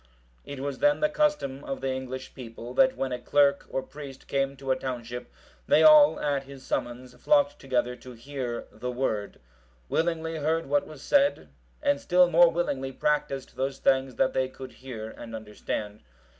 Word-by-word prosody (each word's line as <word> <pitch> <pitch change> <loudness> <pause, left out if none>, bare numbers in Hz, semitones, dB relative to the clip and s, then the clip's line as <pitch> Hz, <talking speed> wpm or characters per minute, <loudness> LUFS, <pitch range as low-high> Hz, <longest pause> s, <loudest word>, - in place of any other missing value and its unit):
It 140 -1 -6
was 140 0 -4
then 290 0 +3
the 305 - +2
custom 295 - 0
of 135 - -4
the 135 0 -1
English 130 0 -6
people, 120 -1 -9
that 260 - +4
when 135 -1 -2
a 125 - -3
clerk 140 +2 +2
or 135 - -2
priest 140 -2 -11
came 135 0 0
to 135 0 -3
a - - +4
township, 125 -2 -6 0.4
they - - +5
all, 305 -1 +8
at 140 -2 -1
his 135 -1 -12
summons, 125 +1 -3
flocked 290 -1 +2
together 125 -2 -1
to 125 +1 -11
hear 120 0 -5
the 125 - -5
Word; 115 -5 -2 0.5
willingly 160 -1 -1
heard 160 +2 0
what 145 +1 +1
was 150 -3 -11
said, 280 - +2 0.3
and 140 0 +2
still 180 0 +4
more 170 +1 +7
willingly 140 -6 -2
practised 140 -1 -1
those 135 +1 -2
things 130 -1 +1
that - - +2
they 130 0 0
could 130 0 -10
hear 115 -4 -8
and 115 -1 -9
understand. 105 -1 -5
135 Hz, 175 wpm, -27 LUFS, 125-150 Hz, 0.5 s, all